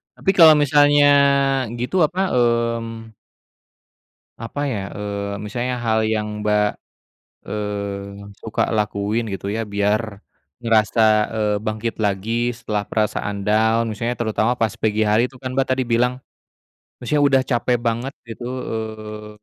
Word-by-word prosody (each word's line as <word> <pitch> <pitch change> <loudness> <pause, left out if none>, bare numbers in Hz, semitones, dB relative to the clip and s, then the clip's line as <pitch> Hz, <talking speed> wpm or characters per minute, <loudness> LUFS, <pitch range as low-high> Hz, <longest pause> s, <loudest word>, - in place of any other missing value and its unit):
Tapi 195 - +1
kalau 165 -5 +8
misalnya 145 0 +4 0.8
gitu, 125 +10 -1
apa, 185 +3 -2 0.5
mmm 115 -1 -9 1.3
Apa 115 +5 -5
ya, 125 -8 -2 0.2
eee, 100 0 -4
misalnya 125 +4 -3
hal 110 -1 +2
yang 105 -1 -2
Mbak, 105 0 +2 0.8
eee, 100 -1 -5
suka 110 - -2
lakuin 105 +1 -1
gitu 95 +1 -5
ya 110 +2 -2
biar, 105 0 -1 0.4
ngerasa, 115 -1 +2 0.3
eee, 105 -1 0
bangkit 110 +1 -3
lagi 110 +4 -1
setelah 105 -3 -3
perasaan 105 -2 -2
down 110 +3 +2
maksudnya 115 +3 -2
terutama 110 0 0
pas 115 -4 -2
pagi 110 0 0
hari 110 +2 +3
itu 125 0 -11
kan 130 - -4
Mbak 135 - +3
tadi 130 - -1
bilang, 125 +1 0 0.8
maksudnya 145 +4 0
udah 140 -2 +4
capek 120 -1 +1
banget 120 +3 -2
gitu, 115 +1 -8
eee, 110 -3 -6
110 Hz, 130 wpm, -21 LUFS, 105-120 Hz, 1.3 s, kalau